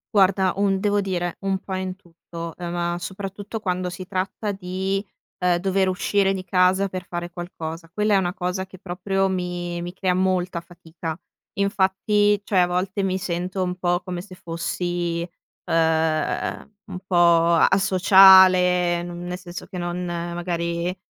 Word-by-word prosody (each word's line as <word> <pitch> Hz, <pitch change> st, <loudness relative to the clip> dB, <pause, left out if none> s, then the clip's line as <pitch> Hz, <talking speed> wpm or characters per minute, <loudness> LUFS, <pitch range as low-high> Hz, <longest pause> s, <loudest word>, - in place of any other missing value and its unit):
Guarda 190 Hz, -1 st, +4 dB
un 195 Hz, -1 st, +1 dB
devo 205 Hz, 0 st, +1 dB
dire 175 Hz, -3 st, -2 dB
un 195 Hz, -1 st, 0 dB
po' 190 Hz, -, -7 dB
in 185 Hz, 0 st, -4 dB
tutto. 170 Hz, -2 st, -9 dB
Ehm, 175 Hz, -1 st, -5 dB
ma 175 Hz, 0 st, -1 dB
soprattutto, 200 Hz, +4 st, -6 dB
quando 180 Hz, -3 st, -2 dB
si 180 Hz, +1 st, -8 dB
tratta 195 Hz, +2 st, -2 dB
di, 190 Hz, +1 st, -3 dB, 0.4 s
ehm, 180 Hz, -1 st, +3 dB
dover 190 Hz, +1 st, +1 dB
uscire 195 Hz, +1 st, +1 dB
di 185 Hz, -1 st, -5 dB
casa 185 Hz, +2 st, +3 dB
per 185 Hz, -1 st, -6 dB
fare 175 Hz, 0 st, -5 dB
qualcosa. 165 Hz, -2 st, -7 dB
Quella 210 Hz, +1 st, +1 dB
è -, -, +6 dB
una 180 Hz, -2 st, 0 dB
cosa 180 Hz, 0 st, -3 dB
che 185 Hz, -1 st, -14 dB
proprio, 195 Hz, +1 st, -1 dB
mi 175 Hz, -2 st, -3 dB
mi 175 Hz, +1 st, -5 dB
crea 185 Hz, 0 st, 0 dB
molta 185 Hz, -1 st, 0 dB
fatica. 170 Hz, -1 st, -8 dB, 0.4 s
Infatti, 200 Hz, +1 st, +2 dB
cioè, 195 Hz, -, +2 dB
a 180 Hz, -, +5 dB
volte 185 Hz, +3 st, -1 dB
mi 190 Hz, -1 st, 0 dB
sento 185 Hz, 0 st, -3 dB
un 180 Hz, -1 st, -1 dB
po' 175 Hz, -1 st, 0 dB
come 180 Hz, -1 st, -4 dB
se 185 Hz, 0 st, -12 dB
fossi, 175 Hz, -1 st, -3 dB, 0.4 s
ehm, 160 Hz, +3 st, 0 dB
un 180 Hz, -, -7 dB
po' 185 Hz, -, -2 dB, 0.4 s
a 165 Hz, -, +5 dB
asociale, 185 Hz, -2 st, +6 dB
non 175 Hz, 0 st, -7 dB
nel 180 Hz, 0 st, -4 dB
senso 180 Hz, -1 st, -9 dB
che 185 Hz, -, -9 dB
non 175 Hz, 0 st, -3 dB
magari, 170 Hz, 0 st, -3 dB
180 Hz, 160 wpm, -23 LUFS, 175-190 Hz, 0.4 s, è